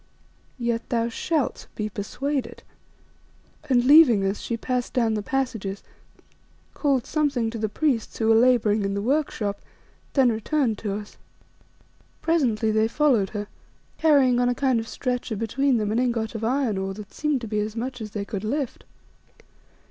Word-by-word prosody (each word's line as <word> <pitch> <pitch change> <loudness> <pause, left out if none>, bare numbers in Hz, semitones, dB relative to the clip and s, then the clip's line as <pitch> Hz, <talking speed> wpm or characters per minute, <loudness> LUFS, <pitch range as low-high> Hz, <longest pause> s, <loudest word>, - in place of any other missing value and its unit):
Yet 235 -1 -2
thou 230 -1 0
shalt 300 +4 -2
be 215 - -2
persuaded," 255 +6 -4 1.1
and 245 -2 +3
leaving 260 -8 +7
us, 195 +1 -1
she 235 - -3
passed 250 +1 -2
down 230 -4 +2
the 210 - -1
passages, 225 -5 -3 0.9
called 275 -4 +1
something 280 -8 0
to 230 - -5
the 215 0 -1
priests 245 0 -1
who 220 - 0
were - - +7
labouring 225 -3 +4
in 195 0 -1
the 200 - -1
workshop, 230 -6 -1 0.5
then 260 -4 +4
returned 225 0 0
to 205 -2 -3
us. 210 0 -8 1.0
Presently 240 -10 +1
they 220 +1 +2
followed 235 -6 +2
her, 210 -1 -4 0.5
carrying 275 -6 +4
on 245 0 +3
a 245 - 0
kind 260 -3 +2
of 225 - -5
stretcher 250 -3 -3
between 245 +5 +1
them 210 -1 -1
an 225 - +1
ingot 235 -3 -1
of 225 -1 -5
iron 240 -4 0
ore 195 0 -3
that 210 -1 -10
seemed 300 -4 -1
to 230 - -5
be 210 0 -1
as 210 +1 -3
much 250 +1 -4
as 215 - -5
they 205 -1 -4
could 200 -2 -5
lift. 265 +3 -3
235 Hz, 165 wpm, -24 LUFS, 215-265 Hz, 1.1 s, leaving